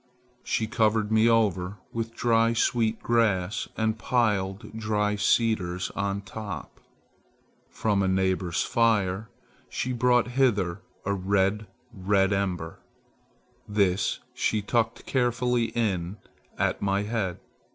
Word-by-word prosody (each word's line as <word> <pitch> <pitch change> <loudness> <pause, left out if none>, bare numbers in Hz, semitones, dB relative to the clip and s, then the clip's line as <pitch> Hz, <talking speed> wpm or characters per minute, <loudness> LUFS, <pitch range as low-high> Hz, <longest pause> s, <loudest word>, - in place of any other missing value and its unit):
She 110 - 0
covered 110 -1 +1
me 110 +1 +5
over 100 -4 +1 0.2
with 115 0 -4
dry 115 -1 +3
sweet 115 -2 +1
grass 105 -5 +1
and 110 0 0
piled 105 -3 0
dry 105 -2 0
cedars 105 -4 +1
on 100 0 -2
top. 100 -1 -7 0.9
From 105 -3 0
a 95 - +1
neighbor's 95 -2 +1
fire 110 -3 +1 0.4
she 125 - -2
brought 125 0 +3
hither 105 -9 +1 0.2
a 100 - +1
red, 100 +2 0 0.3
red 95 0 +2
ember. 90 -4 -2 0.9
This 100 -3 +1 0.2
she 105 -2 0
tucked 115 +1 0
carefully 125 -1 +1
in 100 -5 -2 0.4
at - - 0
my 100 0 +1
head. 105 -5 -2
105 Hz, 110 wpm, -26 LUFS, 95-115 Hz, 0.9 s, me